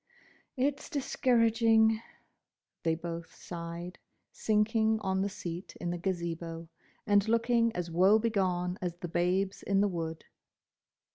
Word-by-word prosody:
"It's 275 +2 -1
discouraging!" 230 -6 +3 0.8
they 165 -1 +1
both 170 0 -6
sighed, 170 +1 -7 0.3
sinking 220 +1 +2
on 190 0 0
the 200 - 0
seat 175 -2 -7
in 175 - -2
the 175 - -3
Gazebo, 170 -2 -3 0.4
and 205 -1 +3
looking 230 0 +3
as 175 -1 -3
woe 190 +5 +5
begone 185 -5 0
as 175 -2 -2
the 175 0 -6
Babes 180 +3 0
in 195 0 +1
the 205 - +4
Wood. 165 -3 -4
190 Hz, 125 wpm, -31 LUFS, 170-220 Hz, 0.8 s, woe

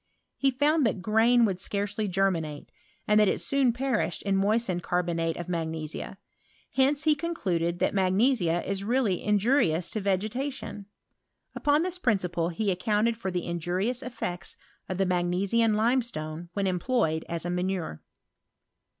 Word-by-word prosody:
He 275 - +2
found 290 +4 +2
that 190 -3 -3
grain 230 +3 +4
would 185 -3 -2
y 205 +1 -1
germinate, 175 -6 -1 0.4
and 210 0 +5
that 210 - +5
it - - +1
soon 275 -3 +2
perished 245 -6 -1
in 195 -1 +1
aed 205 -4 +1
cari)onate 170 -2 -1
of 175 - -5
magnesia:* 160 0 -4 0.5
hence 275 +3 +2
he 310 -1 +5
con*! 335 +3 -3 0.4
that - - 0
magnesia 190 -2 +2
is 195 0 -2
really 225 -4 +1
injurious 205 - +2
to 215 - -2
vege^* 210 +3 -2 0.7
Upon 295 +2 +2
this 365 0 -2
principle 180 - 0
he 200 +4 -1
accounted 210 +5 +1
for 205 -4 -4
the 180 -1 -3
UB 170 0 -3
effects 200 -1 -2 0.3
of 185 - -2
the 195 - +2
magnesian 185 +5 +1
limestone 210 -9 -1
when 190 -2 0
fed 170 -10 0
as 170 0 -2
a 175 - -1
manure. 180 - -2
200 Hz, 140 wpm, -27 LUFS, 175-240 Hz, 0.7 s, and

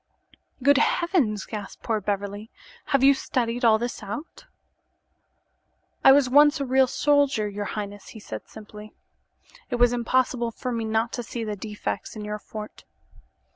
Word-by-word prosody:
"Good 285 +1 +5
heavens!" 290 - +1
gasped 205 -3 -8
poor 220 -3 -1
Beverly. 205 +2 -3 0.4
"Have 275 -1 +1
you 275 +1 +7
studied 245 -2 -2
all 225 -2 +6
this 240 +2 -4
out?" 230 +11 -8 1.6
"I - - +9
was 275 -1 +5
once 295 +4 +5
a 280 - -1
real 260 0 +3
soldier, 285 -5 +2
your 205 0 -5
highness," 205 -1 -6
he 220 - -11
said, 110 - -8
simply. 210 0 -12 0.7
"It 250 - -1
was 245 0 +4
impossible 245 0 0
for 250 +2 -5
me 230 -2 -2
not 220 +2 0
to 245 - -3
see 235 0 -5
the 210 -1 -3
defects 210 0 -5
in 210 -1 -6
your 210 0 -4
fort." 215 0 -9
230 Hz, 155 wpm, -25 LUFS, 210-260 Hz, 1.6 s, I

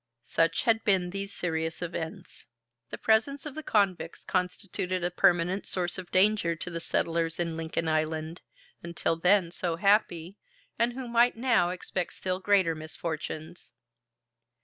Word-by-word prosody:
Such 165 +6 +1
had 225 -2 +2
been 185 -4 +2
these 195 +1 -4
serious 160 -3 -2
events. 170 +1 -6 0.4
The - - -6
presence 235 +7 +2
of 300 - -5
the 315 - -5
convicts 190 - 0
constituted 180 0 -2
a 175 - 0
permanent 180 +1 +2
source 180 0 -2
of 185 - -9
danger 190 -3 +3
to 180 +3 -6
the 165 - -3
settlers 165 0 -1
in 165 -2 -1
Lincoln 165 0 -2
Island, 155 +1 -1 0.4
until 170 -1 -1
then 180 +1 +3
so 175 -1 -2
happy, 195 -1 +1 0.4
and 235 +1 +2
who 255 0 -6
might 235 0 +3
now 230 -8 +3
expect 180 0 -4
still 185 0 -2
greater 190 -4 +3
misfortunes. 155 -1 -6
180 Hz, 145 wpm, -28 LUFS, 165-200 Hz, 0.4 s, danger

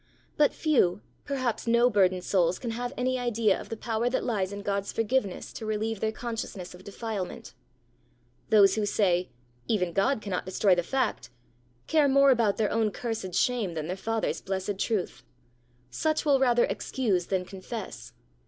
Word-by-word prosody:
But 295 -1 +4
few, 240 - +2 0.2
perhaps 255 -5 -2
no 235 +1 +5
burdened 185 -5 +2
souls 180 -2 +2
can 235 - -4
have 245 +2 -3
any 255 +1 0
idea 230 -4 +1
of - - -11
the 225 - -4
power 230 +1 -1
that 255 - -1
lies 200 -6 -1
in 200 0 -6
God's 200 -1 -1
forgiveness 225 -3 -1
to 225 - -7
relieve 215 0 -1
their 220 +1 0
consciousness 220 -6 -5
of 180 +1 -13
defilement. 200 - -5 1.0
Those 205 -3 +6
who 215 - 0
say, 180 -4 +1 0.4
"Even 180 -6 0
God 220 +8 +2
cannot 200 -4 -3
destroy 190 +1 +3
the 175 - +2
fact!" 245 - -1 0.6
care 305 -3 +3
more 275 0 +5
about 230 -5 +2
their 215 -2 +1
own 225 -1 +2
cursed 210 -4 -4
shame 225 -9 +1
than 155 -1 -3
their 180 +3 -3
Father's 225 +3 -2
blessed 190 +1 -3
truth! 205 - -1 0.7
Such 310 - 0
will 280 -2 +4
rather 245 -2 +4
excuse 200 -9 -1
than 185 -2 -1
confess. 190 - -7
215 Hz, 165 wpm, -28 LUFS, 190-240 Hz, 1.0 s, Those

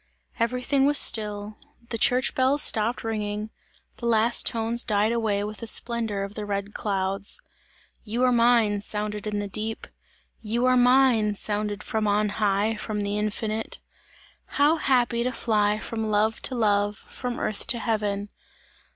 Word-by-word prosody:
Everything 250 +4 +1
was 290 0 +5
still; 210 -2 +1 0.3
the 230 - -2
church 250 +3 +2
bells 265 +3 +3
stopped 225 +2 +2
ringing; 215 -1 -3 0.5
the 235 - -4
last 230 +1 +3
tones 230 +1 +1
died 210 0 +1
away 220 -4 0
with 210 0 -6
the 230 - -6
splendour 225 -4 0
of 200 +1 -7
the 215 - -5
red 200 0 -4
clouds. 195 -1 -1 0.6
"You 235 +3 -2
are 255 - +4
mine!" 230 -4 +3
sounded 210 0 -3
in 210 -1 -2
the 205 0 -3
deep. 215 +3 -3 0.6
"You 230 +3 -1
are 255 0 +4
mine!" 245 -4 +4
sounded 210 0 -3
from 220 -1 -2
on 210 +1 +1
high, 205 +1 0
from 215 -1 -4
the 205 +1 -2
infinite. 215 +1 -3 0.7
How 295 +3 +2
happy 245 -5 +1
to 250 - -1
fly 210 -3 +1
from 220 +1 -4
love 215 +1 +1
to 260 - -6
love, 205 -2 +1
from 245 -1 -6
earth 215 - -3
to 240 - 0
heaven! 210 -3 -2
215 Hz, 155 wpm, -25 LUFS, 205-235 Hz, 0.7 s, was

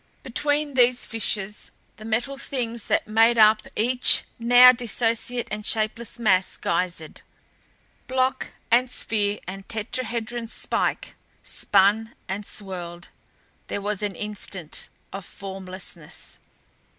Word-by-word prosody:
Between 290 +3 0
these 250 -1 +3
fissures 210 -2 -2 0.3
the 215 - -11
Metal 235 +5 -1
Things 235 -5 -3
that - - +1
made 225 +2 +4
up 215 0 +5
each 245 +3 +5 0.2
now 245 +2 +8
dissociate 240 0 -1
and 210 0 -4
shapeless 225 +2 -1
mass 190 -5 +2
geysered; 170 -2 -2 0.9
block 260 0 0 0.2
and 245 +2 +4
sphere 210 -4 0
and 195 +1 -8
tetrahedron 230 +1 -3
spike - - -1 0.3
spun 205 +3 +2
and 200 +2 -3
swirled. 175 -3 -5 0.6
There - - -3
was 205 0 -2
an 205 -3 -2
instant 195 -5 -5 0.2
of 195 0 -6
formlessness. 185 -4 -8
220 Hz, 110 wpm, -24 LUFS, 195-240 Hz, 0.9 s, now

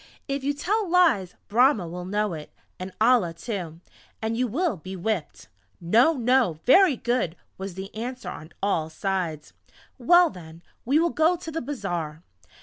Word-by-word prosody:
"If 275 -1 -3
you 285 +1 0
tell 405 +6 -1
lies 320 - +3
Brahma 230 - +3
will 180 +2 -6
know 205 0 -1
it, 155 -2 -8 0.3
and 185 +1 -6
Allah 220 -7 +3
too, 170 -5 -6 0.4
and 220 +1 -2
you 250 +2 0
will 290 - 0
be 185 +4 -8
whipped!" 185 -2 -3 0.3
"No! 230 - +4
No! 250 - +2
Very 360 +3 +6
good!" 240 -8 -1 0.2
was 190 -2 -6
the 190 +1 -7
answer 245 +4 -6
on 155 - -9
all 165 -6 0
sides. 165 -3 -3 0.5
"Well 345 +6 +5
then, 165 -1 -12 0.2
we 275 +5 +3
will 335 +1 +2
go 320 +3 +3
to 330 -2 -8
the 325 - -3
Bazaar!" 175 - -4
220 Hz, 160 wpm, -25 LUFS, 175-275 Hz, 0.5 s, Very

